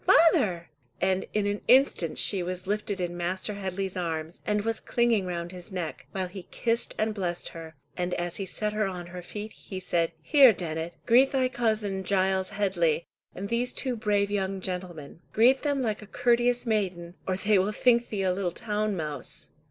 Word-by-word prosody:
father!" 215 Hz, -, +4 dB, 0.3 s
and 190 Hz, 0 st, +1 dB
in 210 Hz, -1 st, 0 dB
an 205 Hz, 0 st, -1 dB
instant 250 Hz, -, +4 dB
she 195 Hz, -3 st, +2 dB
was 180 Hz, +1 st, -4 dB
lifted 205 Hz, 0 st, -2 dB
in 175 Hz, -1 st, -2 dB
Master 185 Hz, +4 st, -2 dB
Headley's 190 Hz, -1 st, -3 dB
arms, 165 Hz, -2 st, -3 dB
and 210 Hz, -1 st, +1 dB
was 225 Hz, 0 st, 0 dB
clinging 235 Hz, -5 st, +1 dB
round 170 Hz, -1 st, -4 dB
his 180 Hz, +2 st, -8 dB
neck, 180 Hz, -4 st, -5 dB
while 190 Hz, -1 st, -2 dB
he 185 Hz, 0 st, -10 dB
kissed 230 Hz, 0 st, -1 dB
and 215 Hz, 0 st, 0 dB
blessed 175 Hz, -4 st, -3 dB
her, 165 Hz, -1 st, -10 dB, 0.2 s
and 180 Hz, 0 st, -1 dB
as 175 Hz, 0 st, -2 dB
he 195 Hz, -, -3 dB
set 210 Hz, +3 st, -2 dB
her 215 Hz, -1 st, +1 dB
on 180 Hz, -2 st, -5 dB
her 180 Hz, -, -5 dB
feet, 210 Hz, +4 st, -7 dB
he 190 Hz, -, -8 dB
said, 170 Hz, -2 st, 0 dB
"Here, 275 Hz, -6 st, +7 dB
Dennet, 165 Hz, -2 st, -4 dB
greet 255 Hz, +4 st, +5 dB
thy 260 Hz, -2 st, +2 dB
cousin 215 Hz, -5 st, 0 dB
Giles 190 Hz, 0 st, +1 dB
Headley, 170 Hz, -5 st, +1 dB, 0.3 s
and 200 Hz, -, -4 dB
these 240 Hz, +3 st, 0 dB
two 255 Hz, -3 st, 0 dB
brave 205 Hz, -2 st, +1 dB
young 195 Hz, -1 st, -1 dB
gentlemen. 180 Hz, -5 st, -5 dB
Greet 250 Hz, +5 st, +5 dB
them 285 Hz, -3 st, 0 dB
like 215 Hz, -3 st, -1 dB
a 210 Hz, -, -11 dB
courteous 240 Hz, +2 st, +2 dB
maiden, 185 Hz, -6 st, -1 dB
or 185 Hz, -, +1 dB
they 205 Hz, 0 st, +3 dB
will 195 Hz, +3 st, +1 dB
think 235 Hz, +2 st, +3 dB
thee 200 Hz, -3 st, -2 dB
a 185 Hz, -1 st, +2 dB
little 185 Hz, -1 st, -1 dB
town 210 Hz, +2 st, -2 dB
mouse." 150 Hz, -5 st, -3 dB
195 Hz, 190 wpm, -28 LUFS, 180-215 Hz, 0.3 s, Here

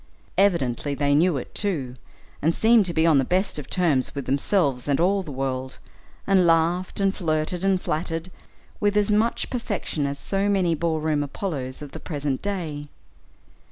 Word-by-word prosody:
Evidently 145 Hz, -8 st, +1 dB
they 145 Hz, 0 st, +1 dB
knew 160 Hz, +1 st, +3 dB
it, 125 Hz, -, -7 dB
too, 150 Hz, -12 st, -1 dB, 0.5 s
and 165 Hz, +3 st, +2 dB
seemed 225 Hz, -3 st, +4 dB
to -, -, -1 dB
be 160 Hz, -, +3 dB
on 155 Hz, -4 st, +5 dB
the -, -, +2 dB
best 185 Hz, +3 st, 0 dB
of 140 Hz, -, -9 dB
terms 155 Hz, -9 st, +1 dB
with 140 Hz, -2 st, -4 dB
themselves 140 Hz, -1 st, +1 dB
and 140 Hz, -1 st, +1 dB
all 195 Hz, +3 st, +2 dB
the 160 Hz, -, -8 dB
world, 130 Hz, -1 st, -3 dB, 0.5 s
and 190 Hz, -3 st, +4 dB
laughed, 170 Hz, +4 st, +1 dB
and 195 Hz, -1 st, +2 dB
flirted, 160 Hz, 0 st, -1 dB
and 195 Hz, -1 st, +2 dB
flattered, 165 Hz, +2 st, -3 dB, 0.5 s
with 205 Hz, 0 st, +1 dB
as 210 Hz, 0 st, +2 dB
much 220 Hz, +3 st, +1 dB
perfection 205 Hz, -, -2 dB
as 140 Hz, 0 st, -4 dB
so 195 Hz, +5 st, -1 dB
many 185 Hz, -4 st, +2 dB
ball 160 Hz, 0 st, -1 dB
room 155 Hz, -1 st, 0 dB
Apollos 140 Hz, -3 st, -4 dB
of 145 Hz, -, -9 dB
the -, -, -8 dB
present 145 Hz, -4 st, -3 dB
day. 160 Hz, -8 st, -4 dB
165 Hz, 175 wpm, -24 LUFS, 140-190 Hz, 0.5 s, on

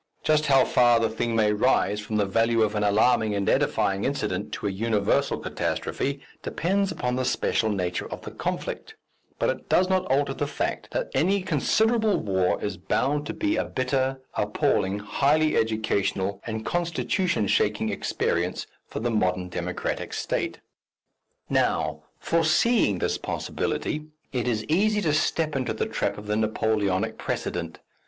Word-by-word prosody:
Just 155 Hz, 0 st, +2 dB
how 135 Hz, -2 st, +5 dB
far 120 Hz, -1 st, +4 dB
the 115 Hz, -1 st, +1 dB
thing 115 Hz, +1 st, -1 dB
may 105 Hz, -2 st, +3 dB
rise 105 Hz, -2 st, +2 dB
from 105 Hz, +1 st, -5 dB
the 105 Hz, -, +2 dB
value 115 Hz, +3 st, +2 dB
of 105 Hz, -, 0 dB
an 105 Hz, -1 st, 0 dB
alarming 110 Hz, +1 st, +3 dB
and 100 Hz, -1 st, -1 dB
edifying 95 Hz, 0 st, +1 dB
incident 105 Hz, -8 st, -2 dB
to -, -, -5 dB
a 100 Hz, -, +1 dB
universal 105 Hz, +1 st, +1 dB
catastrophe, 140 Hz, 0 st, -2 dB, 0.2 s
depends 195 Hz, +4 st, 0 dB
upon 125 Hz, -7 st, -2 dB
the 130 Hz, -, 0 dB
special 110 Hz, -2 st, +1 dB
nature 90 Hz, -4 st, -2 dB
of -, -, -6 dB
the -, -, -7 dB
conflict, -, -, -4 dB, 0.4 s
but -, -, +2 dB
it -, -, -8 dB
does 185 Hz, +1 st, +3 dB
not 185 Hz, 0 st, +1 dB
alter 135 Hz, +1 st, +1 dB
the 145 Hz, -, -2 dB
fact -, -, -3 dB
that -, -, -3 dB
any 195 Hz, +1 st, +2 dB
considerable 220 Hz, -, +2 dB
war 95 Hz, -3 st, +1 dB
is 100 Hz, -2 st, -3 dB
bound 145 Hz, +11 st, 0 dB
to 165 Hz, -, -3 dB
be 315 Hz, 0 st, 0 dB
a -, -, +1 dB
bitter, 130 Hz, 0 st, -1 dB
appalling, 95 Hz, +2 st, +1 dB
highly 145 Hz, +9 st, +2 dB
educational 110 Hz, -3 st, 0 dB
and 110 Hz, -1 st, -4 dB
constitution 170 Hz, -, 0 dB
shaking -, -, +1 dB
experience 85 Hz, +2 st, -1 dB, 0.2 s
for -, -, -5 dB
the 120 Hz, +1 st, 0 dB
modern 90 Hz, -4 st, 0 dB
democratic -, -, -3 dB
state. -, -, -2 dB, 0.9 s
Now, -, -, +1 dB, 0.2 s
foreseeing 165 Hz, -, +2 dB
this -, -, -1 dB
possibility, 155 Hz, 0 st, -3 dB, 0.3 s
it 125 Hz, -2 st, -1 dB
is 110 Hz, -3 st, 0 dB
easy 210 Hz, -, +2 dB
to 155 Hz, -6 st, +1 dB
step 155 Hz, 0 st, +1 dB
into 130 Hz, -2 st, -1 dB
the -, -, -1 dB
trap -, -, -2 dB
of 105 Hz, -, -9 dB
the 105 Hz, 0 st, 0 dB
Napoleonic 110 Hz, -1 st, 0 dB
precedent. 85 Hz, -2 st, -3 dB
115 Hz, 155 wpm, -26 LUFS, 105-155 Hz, 0.9 s, how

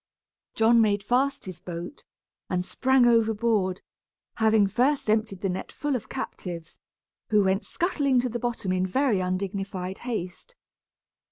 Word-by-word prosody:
John 230 Hz, +1 st, +5 dB
made 205 Hz, -2 st, +2 dB
fast 260 Hz, +6 st, +1 dB
his 185 Hz, -2 st, -8 dB
boat, 175 Hz, -, -7 dB, 0.5 s
and 180 Hz, 0 st, -1 dB
sprang 265 Hz, +2 st, +3 dB
overboard, 220 Hz, -4 st, +2 dB, 0.6 s
having 220 Hz, -2 st, +4 dB
first 245 Hz, +4 st, +1 dB
emptied 215 Hz, -3 st, 0 dB
the 195 Hz, -, 0 dB
net 180 Hz, -, -4 dB
full 290 Hz, -2 st, -2 dB
of 245 Hz, -, -5 dB
captives, 175 Hz, -10 st, -6 dB, 0.5 s
who 210 Hz, -2 st, +4 dB
went 190 Hz, +1 st, +1 dB
scuttling 285 Hz, -7 st, +1 dB
to 250 Hz, -, -2 dB
the 240 Hz, +1 st, -3 dB
bottom 235 Hz, -5 st, -2 dB
in 185 Hz, 0 st, +1 dB
very 250 Hz, 0 st, +1 dB
undignified 190 Hz, 0 st, -3 dB
haste. 230 Hz, -, -5 dB
215 Hz, 140 wpm, -26 LUFS, 185-245 Hz, 0.6 s, John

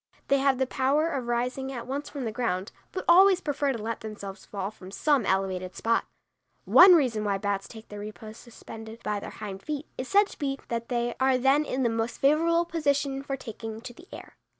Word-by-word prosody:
They 275 Hz, -, +4 dB
have 270 Hz, -1 st, +3 dB
the 265 Hz, -, +1 dB
power 280 Hz, +5 st, +1 dB
of 260 Hz, -5 st, -3 dB
rising 250 Hz, +3 st, -1 dB
at 240 Hz, -3 st, -6 dB
once 280 Hz, +3 st, -4 dB
from 280 Hz, -4 st, -5 dB
the 225 Hz, -, -2 dB
ground, 210 Hz, -4 st, -2 dB, 0.2 s
but 370 Hz, -, -5 dB
always 375 Hz, +2 st, +7 dB
prefer 290 Hz, -4 st, -1 dB
to 250 Hz, -, -3 dB
let 225 Hz, +1 st, -4 dB
themselves 205 Hz, -2 st, -8 dB
fall 200 Hz, 0 st, -4 dB
from 185 Hz, -3 st, -12 dB
some 270 Hz, +2 st, +1 dB
elevated 185 Hz, -1 st, -1 dB
spot. 230 Hz, 0 st, +1 dB, 0.6 s
One 365 Hz, 0 st, +9 dB
reason 245 Hz, -9 st, +1 dB
why 200 Hz, -2 st, 0 dB
bats 200 Hz, 0 st, -2 dB
take 220 Hz, -1 st, -12 dB
their 210 Hz, -, -8 dB
repose 215 Hz, +1 st, -9 dB
suspended 225 Hz, -1 st, -11 dB
by 210 Hz, -1 st, -1 dB
their -, -, -7 dB
hind 195 Hz, -2 st, -7 dB
feet 300 Hz, +3 st, -4 dB
is 255 Hz, -, -3 dB
said 405 Hz, +5 st, +5 dB
to -, -, -13 dB
be 275 Hz, -2 st, -1 dB
that 235 Hz, 0 st, -3 dB
they 240 Hz, -1 st, 0 dB
are 265 Hz, -1 st, +3 dB
then 270 Hz, +4 st, +3 dB
in 265 Hz, -1 st, -1 dB
the -, -, +3 dB
most 225 Hz, +1 st, -2 dB
favorable 330 Hz, +4 st, +3 dB
position 285 Hz, -4 st, 0 dB
for 275 Hz, 0 st, -4 dB
taking 225 Hz, -2 st, -7 dB
to 245 Hz, 0 st, -8 dB
the 345 Hz, +8 st, -16 dB
air. -, -, -11 dB
250 Hz, 215 wpm, -27 LUFS, 215-280 Hz, 0.6 s, One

